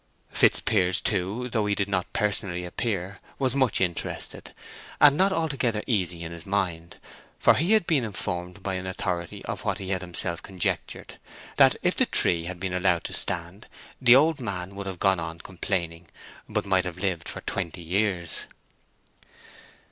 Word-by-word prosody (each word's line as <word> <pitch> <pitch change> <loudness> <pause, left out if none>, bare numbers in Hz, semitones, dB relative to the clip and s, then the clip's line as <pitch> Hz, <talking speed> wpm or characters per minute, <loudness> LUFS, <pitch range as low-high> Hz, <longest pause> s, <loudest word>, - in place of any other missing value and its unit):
Fitzpiers 95 -4 +3
too, 105 +5 -1
though 110 -3 +1
he 100 - +1
did 100 -1 0
not 95 -2 -1
personally 100 -4 0
appear, 95 0 -3 0.2
was 130 -2 +1
much 130 -5 +2
interested, 90 -3 -3 0.5
and 145 -1 +8
not 190 +4 +3
altogether 135 - 0
easy 90 -7 -1
in 80 - -6
his 85 -1 -8
mind; 90 -4 -2 0.4
for - - +6
he 170 +9 +2
had 215 -5 +4
been 150 -7 +2
informed 95 -3 -4
by 95 - -2
an 95 0 -3
authority 90 -2 -3
of - - -4
what - - -1
he 95 - -5
had 95 -2 0
himself 85 -1 -3
conjectured, 95 -3 -3 0.4
that - - +7
if - - +2
the - - +3
tree 85 -1 +2
had 90 0 -5
been 95 0 -3
allowed 90 -3 +2
to - - -6
stand, 85 +5 -2 0.3
the 120 -1 +8
old 155 +3 +4
man 95 -5 -4
would 100 0 -6
have 95 -2 -5
gone 95 0 +3
on 80 0 -5
complaining, 85 -2 -3 0.4
but - - -1
might 95 -2 +2
have 90 -1 -5
lived 90 -3 -2
for - - -6
twenty 90 -2 -4
years. 90 -1 -1
95 Hz, 170 wpm, -26 LUFS, 90-105 Hz, 0.5 s, and